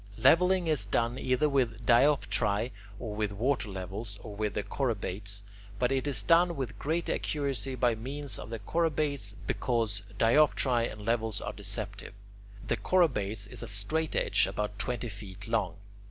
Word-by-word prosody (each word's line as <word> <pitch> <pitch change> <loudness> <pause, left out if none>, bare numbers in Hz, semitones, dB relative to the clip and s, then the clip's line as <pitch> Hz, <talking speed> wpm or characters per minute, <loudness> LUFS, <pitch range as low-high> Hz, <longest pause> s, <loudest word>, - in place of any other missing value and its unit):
Levelling 175 +9 +5
is 150 -10 +1
done 115 +4 0
either 130 +4 +2
with 125 -5 0
dioptrae, 120 -4 +3 0.3
or 110 -2 -5
with 105 -1 -1
water 120 +2 0
levels, 100 +2 -6
or 105 -2 -7
with 105 0 -2
the 105 - 0
chorobates, 100 -6 -2 0.3
but 125 +4 +1
it 135 +1 0
is 125 -8 +2
done 170 - +4
with 120 -8 -4
greater 160 +3 0
accuracy 135 -4 -1
by 120 -1 +3
means 135 +6 -3
of - - -7
the 115 - -3
chorobates, 145 -4 0
because 115 -5 0 0.2
dioptrae 120 0 +3
and 105 -1 -9
levels 115 -2 0
are - - -4
deceptive. 100 +1 -6 0.5
The 115 - +1
chorobates 110 - +2
is 105 - -8
a - - -5
straightedge 105 +11 +1
about 105 -1 -3
twenty 120 -2 -1
feet 100 -2 -8
long. 105 -6 0
115 Hz, 155 wpm, -30 LUFS, 105-140 Hz, 0.5 s, Levelling